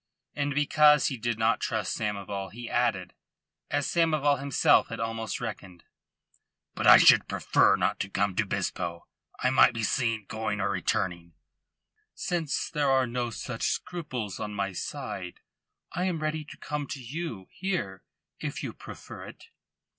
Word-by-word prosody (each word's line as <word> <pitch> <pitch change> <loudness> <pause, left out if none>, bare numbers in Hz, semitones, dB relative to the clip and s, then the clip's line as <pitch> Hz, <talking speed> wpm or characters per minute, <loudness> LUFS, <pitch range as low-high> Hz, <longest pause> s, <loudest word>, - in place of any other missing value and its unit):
And 145 -1 -2
because 150 +1 +5
he 135 - -4
did 120 0 -1
not 110 +1 +2
trust 110 -3 -1
Samoval 100 -2 -3
he 120 +1 -7
added, 115 -8 0 0.6
as 145 0 0
Samoval 155 -4 +2
himself 140 -1 +4
had - - -6
almost 115 0 -3
reckoned: 95 -7 -7 0.9
"But - - -1
I - - +11
should - - +7
prefer - - +3
not - - 0
to 95 - -2
come 100 -1 0
to - - +2
Bispo. 85 -1 -2 0.4
I 130 - +3
might 125 -2 +5
be 115 - -2
seen 115 -1 0
going 110 -1 -3
or 95 - 0
returning." 85 -2 -2 0.8
"Since 170 -5 -2
there 145 -3 +1
are 130 -1 +4
no 120 0 -2
such 115 +1 -3
scruples 130 - -4
on 105 0 -4
my 100 -1 -2
side, 90 0 -6 0.5
I 180 +2 -1
am 180 -3 0
ready 155 0 -2
to - - -12
come 150 -1 -4
to 145 -1 -5
you 125 - -5
here 175 - -3 0.4
if - - -4
you - - -4
prefer - - -10
it." - - -13
120 Hz, 155 wpm, -28 LUFS, 100-145 Hz, 0.9 s, I